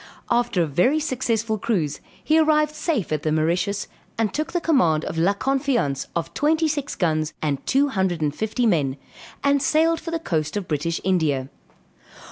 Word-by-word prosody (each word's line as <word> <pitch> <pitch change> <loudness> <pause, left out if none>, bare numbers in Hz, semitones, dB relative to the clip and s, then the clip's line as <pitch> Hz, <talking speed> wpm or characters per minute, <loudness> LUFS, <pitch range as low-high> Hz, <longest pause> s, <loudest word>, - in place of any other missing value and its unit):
After 240 -7 +2
a - - +1
very 180 - +2
successful 230 -7 -1
cruise 190 -11 -1 0.2
he 315 +1 +3
arrived 305 -1 +3
safe 305 - -2
at 155 -1 0
the 155 - -1
Mauritius, 175 +6 0 0.3
and 225 -2 0
took 310 +2 -2
the 350 - 0
command 175 - +2
of 160 - -3
La 185 +5 +3
Confiance 265 - 0
of 170 - -3
twenty 315 +2 +2
six 290 -2 -2
guns 155 -3 0
and 145 -3 -2
two 280 +2 +3
hundred 190 -7 0
and 150 -2 0
fifty 220 +6 -1
men, 145 -10 +1 0.5
and 280 0 +3
sailed 325 +3 +2
for 330 - -7
the 330 - -1
coast 160 - -2
of 200 - -4
British 160 +2 -1
India. 155 -8 +1
210 Hz, 175 wpm, -23 LUFS, -, 0.5 s, he